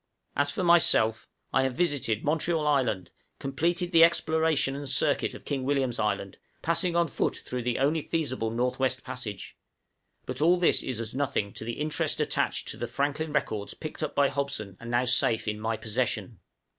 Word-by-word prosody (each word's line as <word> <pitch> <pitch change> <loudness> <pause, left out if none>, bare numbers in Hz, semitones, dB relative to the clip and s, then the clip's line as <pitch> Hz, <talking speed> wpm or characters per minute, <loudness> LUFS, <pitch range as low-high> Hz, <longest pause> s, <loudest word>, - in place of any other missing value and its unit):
As 145 +1 +2
for 185 - -2
myself 110 -10 +4 0.3
I 130 - +4
have 130 -1 -1
visited 140 -10 0
Montreal 160 +1 0
Island, 130 -10 +1 0.3
completed 170 +6 -1
the 165 -2 +7
exploration 160 -4 +2
and 140 -1 -5
circuit 140 +2 +1
of - - -12
King 140 -3 -2
William's 135 -3 0
Island, 100 -2 -1 0.3
passing 170 +1 +1
on 170 0 +3
foot - - -1
through 125 0 -3
the 120 0 -1
only 150 +4 +2
feasible 140 -9 -2
North 125 +3 -1
West 130 0 0
Passage; 125 -6 -7 0.7
but - - -4
all 175 +3 +5
this 175 - +3
is 125 -4 -3
as 115 -1 -5
nothing 130 -7 -1
to - - -7
the 120 +1 -3
interest 150 +4 -1
attached - - 0
to - - -3
the - - -3
Franklin 145 +2 -2
records 110 -8 -2
picked 155 0 -7
up 155 - -3
by 140 -1 +4
Hobson, 135 -8 -3
and 115 - -8
now 120 +1 +2
safe 120 -3 +2
in 105 0 -2
my 110 +1 -1
possession! 115 -1 -2
135 Hz, 180 wpm, -28 LUFS, 115-155 Hz, 0.7 s, the